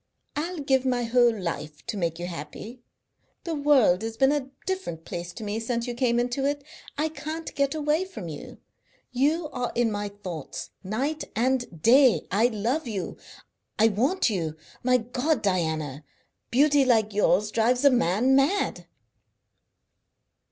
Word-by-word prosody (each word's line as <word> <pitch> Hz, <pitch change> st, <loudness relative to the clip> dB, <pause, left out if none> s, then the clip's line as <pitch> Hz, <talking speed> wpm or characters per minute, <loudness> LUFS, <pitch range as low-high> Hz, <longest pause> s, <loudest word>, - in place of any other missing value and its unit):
I'll 340 Hz, +5 st, -3 dB
give 270 Hz, -3 st, +1 dB
my 250 Hz, -2 st, 0 dB
whole 235 Hz, -1 st, +3 dB
life 155 Hz, -4 st, -5 dB
to 230 Hz, -, -4 dB
make 170 Hz, -4 st, -1 dB
you 175 Hz, -, -4 dB
happy. 175 Hz, -, -8 dB, 0.6 s
The 335 Hz, -, -3 dB
world 280 Hz, -, +4 dB
has 225 Hz, 0 st, -5 dB
been 265 Hz, +2 st, +4 dB
a 285 Hz, -3 st, -1 dB, 0.2 s
different 375 Hz, -, -4 dB
place 175 Hz, 0 st, -5 dB
to 225 Hz, -, -8 dB
me 210 Hz, +1 st, -2 dB
since 235 Hz, +1 st, -2 dB
you 245 Hz, -, -3 dB
came 240 Hz, -1 st, +1 dB
into 245 Hz, +2 st, -1 dB
it. 285 Hz, +1 st, -1 dB, 0.3 s
I 305 Hz, +2 st, +1 dB
can't 315 Hz, +1 st, -6 dB
get 280 Hz, +1 st, 0 dB
away 305 Hz, +4 st, +1 dB
from 220 Hz, -, -8 dB
you. 150 Hz, -3 st, -8 dB, 0.5 s
You 300 Hz, +6 st, +1 dB
are 250 Hz, -3 st, -3 dB
in 235 Hz, -2 st, +2 dB
my 205 Hz, 0 st, -3 dB
thoughts 185 Hz, -7 st, -7 dB
night 265 Hz, +11 st, -2 dB
and 240 Hz, -8 st, -1 dB
day. 255 Hz, +1 st, +6 dB
I 215 Hz, +5 st, +4 dB
love 245 Hz, +6 st, -1 dB
you; 200 Hz, -6 st, -4 dB, 0.6 s
I 220 Hz, +1 st, +5 dB
want 260 Hz, -, +1 dB
you. 170 Hz, -8 st, -2 dB, 0.3 s
My 250 Hz, 0 st, +4 dB
God, 250 Hz, +4 st, -1 dB
Diana! 160 Hz, -7 st, -1 dB, 0.5 s
Beauty 285 Hz, +2 st, +4 dB
like 220 Hz, -5 st, +2 dB
yours 210 Hz, 0 st, +2 dB
drives 245 Hz, +5 st, +2 dB
a 280 Hz, -, +8 dB
man 240 Hz, +3 st, +3 dB
mad!" 290 Hz, +10 st, +1 dB
240 Hz, 155 wpm, -26 LUFS, 205-280 Hz, 0.6 s, a